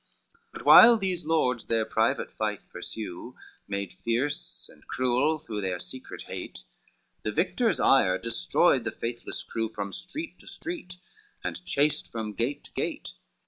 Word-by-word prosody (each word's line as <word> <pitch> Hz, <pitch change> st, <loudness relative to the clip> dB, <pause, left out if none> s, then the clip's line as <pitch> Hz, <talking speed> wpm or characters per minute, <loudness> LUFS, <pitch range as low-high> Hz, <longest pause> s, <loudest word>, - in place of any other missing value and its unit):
XXIX 465 Hz, -, -35 dB
But -, -, -9 dB
while 235 Hz, 0 st, +10 dB
these 185 Hz, -5 st, -2 dB
lords 125 Hz, -8 st, +1 dB
their 115 Hz, -1 st, +2 dB
private 110 Hz, +1 st, +1 dB
fight 105 Hz, -2 st, -3 dB
pursue, 110 Hz, +3 st, -7 dB, 0.3 s
Made 100 Hz, -2 st, -3 dB
fierce 130 Hz, +6 st, -1 dB
and -, -, -20 dB
cruel 130 Hz, +5 st, +2 dB
through 110 Hz, -8 st, -5 dB
their 95 Hz, -2 st, -2 dB
secret 130 Hz, +10 st, -7 dB
hate, -, -, -7 dB, 0.6 s
The 105 Hz, -, -2 dB
victor's 195 Hz, -, +1 dB
ire 95 Hz, -9 st, +5 dB
destroyed 115 Hz, +3 st, +2 dB
the -, -, -1 dB
faithless 120 Hz, 0 st, -5 dB
crew 115 Hz, -1 st, -2 dB
From 100 Hz, -3 st, -5 dB
street 320 Hz, +2 st, -6 dB
to -, -, -16 dB
street, 315 Hz, -, -6 dB, 0.5 s
and -, -, -4 dB
chased 150 Hz, +2 st, +1 dB
from 110 Hz, -2 st, -4 dB
gate 130 Hz, +8 st, -2 dB
to -, -, -15 dB
gate. -, -, -3 dB
120 Hz, 150 wpm, -28 LUFS, 105-155 Hz, 0.6 s, while